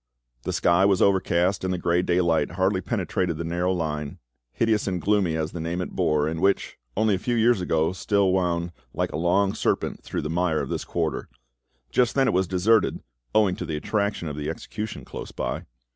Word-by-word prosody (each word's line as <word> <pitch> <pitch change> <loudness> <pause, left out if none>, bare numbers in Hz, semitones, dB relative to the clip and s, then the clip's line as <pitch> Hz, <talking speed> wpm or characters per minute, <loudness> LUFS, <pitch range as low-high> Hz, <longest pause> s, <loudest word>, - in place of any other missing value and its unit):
The - - -1
sky 85 +1 +3
was 100 -1 +4
overcast, 95 -1 +2
and 95 - 0
the 90 - 0
grey 85 0 +2
daylight 85 -2 +1
hardly 95 +1 +1
penetrated 90 -2 -1
the 85 - -3
narrow 85 +2 0
lane, 75 -5 -3 0.3
hideous 110 - +1
and 90 -2 -1
gloomy 95 -2 +2
as 80 +1 -2
the 85 - -6
name 85 +2 -2
it 90 - -3
bore, 75 -1 +1
and 80 +1 -2
which; 100 +3 +1 0.2
only 110 0 +3
a 95 - 0
few 120 +4 -1
years 115 -2 +3
ago, 80 -1 +1
still 100 0 +2
wound 85 -2 0 0.2
like - - -1
a - - -5
long 95 +5 +2
serpent - - -1
through - - -4
the - - -2
mire 85 -2 +1
of - - -3
this - - -3
quarter. 80 -3 -2 0.6
Just 125 -2 +2
then 135 -1 +3
it - - +2
was 95 0 +2
deserted, 95 +4 +2 0.3
owing 105 -4 +4
to - - -4
the 80 - -2
attraction 100 +1 -1
of 75 - -4
the 75 0 -3
execution 105 +6 -6
close - - -7
by. - - -3
90 Hz, 205 wpm, -25 LUFS, 85-100 Hz, 0.6 s, was